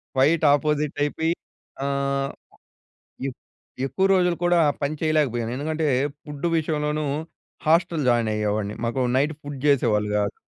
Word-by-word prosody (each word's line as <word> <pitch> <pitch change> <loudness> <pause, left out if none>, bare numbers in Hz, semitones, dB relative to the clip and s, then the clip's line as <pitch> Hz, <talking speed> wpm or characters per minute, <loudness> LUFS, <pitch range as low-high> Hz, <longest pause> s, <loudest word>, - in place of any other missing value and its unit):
Quite 150 +5 +3
opposite 150 0 +1
అయిపోయి 160 +3 0 0.5
ఆహ్, 140 0 0 1.0
ఎ - - 0 0.6
ఎక్కువ 135 +9 0
రోజులు 180 -2 +3
కూడా 175 -1 +4 0.2
పని 145 +2 -1
చేయలేకపోయాను. 140 -8 +1
ఎందుకంటే, 155 +2 -1 0.4
ఫుడ్డు 150 +2 -4
విషయంలోనూ 150 -1 -1 0.6
హాస్టల్ 165 -1 +3
జాయిన్ 120 -2 +3
అయ్యేవాడిని. 105 0 -1
మాకు 120 +3 -1
నైట్ 145 +4 +2
ఫుడ్ 145 -1 -7
జేసేవాళ్ళు 110 -7 +3
గాదు. 100 -1 0
145 Hz, 120 wpm, -24 LUFS, 130-155 Hz, 1.0 s, కూడా